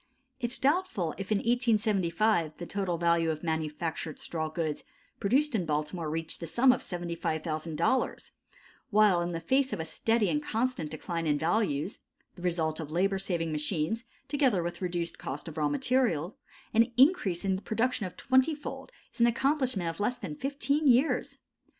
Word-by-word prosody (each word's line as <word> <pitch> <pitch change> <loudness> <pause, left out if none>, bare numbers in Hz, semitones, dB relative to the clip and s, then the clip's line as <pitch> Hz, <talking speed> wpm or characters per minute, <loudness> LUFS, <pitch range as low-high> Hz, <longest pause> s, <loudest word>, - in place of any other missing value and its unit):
It 240 -2 -1
is - - +2
doubtful 280 - +1
if 195 +2 -5
in 210 - +4
1875 215 - +1
the 175 - -6
total 190 -2 -2
value 170 -1 +2
of 155 0 -3
manufactured 160 0 -3
straw 160 -2 -3
goods 155 -2 -3 0.4
produced 275 +8 +2
in 210 -5 +1
Baltimore 155 +2 -2
reached 165 +1 -1
the 165 - -5
sum 255 +10 +5
of 250 - 0
$75,000, 165 - -2 0.6
while 205 -4 +5
in 175 - -1
the 165 - -3
face 265 +10 +1
of - - -3
a 160 - -2
steady 225 +6 +1
and 295 - 0
constant 240 - -1
decline 165 +2 -3
in 145 -1 +2
values 170 0 0 0.4
the 180 - -12
result 165 -3 0
of 155 -3 -5
labor 190 +3 +1
saving 170 -4 -1
machines, 155 +7 -1 0.2
together 260 - +2
with 175 +1 -5
reduced 175 -2 -2
cost 140 +5 -5
of 160 - -7
raw 150 -2 +1
material 225 - +1 0.4
an 230 +2 +4
increase 245 - +4
in 190 -1 +1
production 220 +1 0
of 180 - -12
twenty 260 +4 +3
fold 295 +10 -8 0.2
is - - -5
an 235 - +7
accomplishment 255 - +1
of 165 - -4
less 240 +4 0
than 150 - -6
fifteen 280 - 0
years. 260 +4 +3
185 Hz, 170 wpm, -29 LUFS, 165-240 Hz, 0.6 s, an